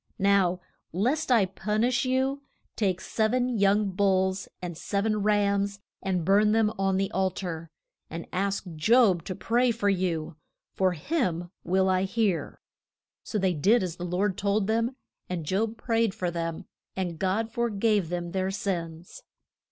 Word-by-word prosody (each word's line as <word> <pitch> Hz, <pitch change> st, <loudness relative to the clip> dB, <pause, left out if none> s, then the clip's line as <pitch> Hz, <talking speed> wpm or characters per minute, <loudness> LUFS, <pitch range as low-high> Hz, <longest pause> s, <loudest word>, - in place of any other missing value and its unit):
Now, 195 Hz, -2 st, +3 dB, 0.3 s
lest 255 Hz, -, 0 dB
I 225 Hz, -5 st, +5 dB
pun 210 Hz, +3 st, -2 dB
ish 250 Hz, +2 st, +2 dB
you, 265 Hz, +2 st, 0 dB, 0.3 s
take 190 Hz, -4 st, 0 dB
sev 220 Hz, +4 st, 0 dB
en 250 Hz, 0 st, +1 dB
young 200 Hz, 0 st, +3 dB
bulls 190 Hz, 0 st, +1 dB
and 175 Hz, -2 st, -5 dB
sev 200 Hz, +5 st, -2 dB
en 215 Hz, -1 st, +1 dB
rams 200 Hz, -1 st, +1 dB, 0.2 s
and 185 Hz, -4 st, -1 dB
burn 210 Hz, +3 st, +4 dB
them 220 Hz, -1 st, +2 dB
on 195 Hz, -1 st, +2 dB
the 195 Hz, +1 st, -1 dB
al 190 Hz, 0 st, +2 dB
tar, 170 Hz, -3 st, -6 dB, 0.4 s
and 165 Hz, +1 st, -6 dB
ask 200 Hz, +2 st, -1 dB
Job 200 Hz, 0 st, +4 dB
to 185 Hz, -, -4 dB
pray 245 Hz, +5 st, +2 dB
for 225 Hz, -3 st, +1 dB
you, 170 Hz, -5 st, -1 dB, 0.4 s
for 185 Hz, -1 st, +2 dB
him 175 Hz, -, -2 dB
will 190 Hz, +1 st, +2 dB
I 185 Hz, 0 st, +2 dB
hear. 195 Hz, -3 st, -1 dB, 0.6 s
So 215 Hz, -, -4 dB
they 190 Hz, -2 st, +2 dB
did 195 Hz, +9 st, +3 dB
as 175 Hz, -2 st, -4 dB
the 175 Hz, -, -6 dB
Lord 185 Hz, +2 st, -1 dB
told 200 Hz, 0 st, +1 dB
them, 230 Hz, +4 st, 0 dB, 0.3 s
and 175 Hz, -3 st, -3 dB
Job 215 Hz, +7 st, -1 dB
prayed 225 Hz, -3 st, 0 dB
for 180 Hz, -1 st, -2 dB
them, 165 Hz, -1 st, -4 dB, 0.3 s
and 175 Hz, -4 st, -3 dB
God 210 Hz, +4 st, 0 dB
for 235 Hz, +1 st, 0 dB
gave 205 Hz, -4 st, +1 dB
them 175 Hz, -1 st, -3 dB
their 190 Hz, 0 st, -1 dB
sins. 175 Hz, -4 st, -4 dB
195 Hz, 165 wpm, -27 LUFS, 180-215 Hz, 0.6 s, I